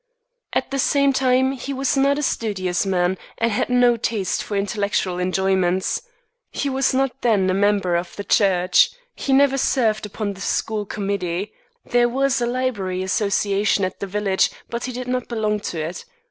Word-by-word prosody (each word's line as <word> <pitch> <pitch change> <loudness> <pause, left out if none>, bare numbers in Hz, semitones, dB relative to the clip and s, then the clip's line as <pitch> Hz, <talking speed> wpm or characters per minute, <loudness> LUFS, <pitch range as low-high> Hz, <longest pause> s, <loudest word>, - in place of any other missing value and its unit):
At - - -1
the 275 - -1
same 280 +1 +3
time 260 0 +2
he 270 +1 -5
was 270 0 0
not 275 +1 +3
a 295 - -2
studious 190 -7 -1
man, 180 0 +1 0.2
and 230 0 +1
had 205 - -1
no 245 -1 +4
taste 215 -4 -1
for 205 - -3
intellectual 200 -2 -1
enjoyments. 185 0 +1 0.5
He 285 - -2
was 270 +1 +1
not 270 0 -1
then 210 -6 +2
a - - +1
member 200 -2 +2
of 170 0 -3
the 200 - -5
church. 185 -3 +3 0.3
He 275 - -3
never 275 0 +4
served 215 -5 +1
upon 205 0 -4
the 195 - -12
school 210 0 -1
committee. 200 -1 -3 0.3
There 240 0 +2
was 270 0 +1
a 240 - +1
Library 215 -8 -2
Association 200 0 +1
at 185 - -6
the 200 - -4
next - - -16
village, 200 -2 +2 0.2
but 235 0 -3
he 255 - -4
did 250 0 -6
not 250 -1 -2
belong 215 -3 -1
to 175 -5 -5
it. 160 +3 -4
210 Hz, 180 wpm, -22 LUFS, 190-250 Hz, 0.5 s, no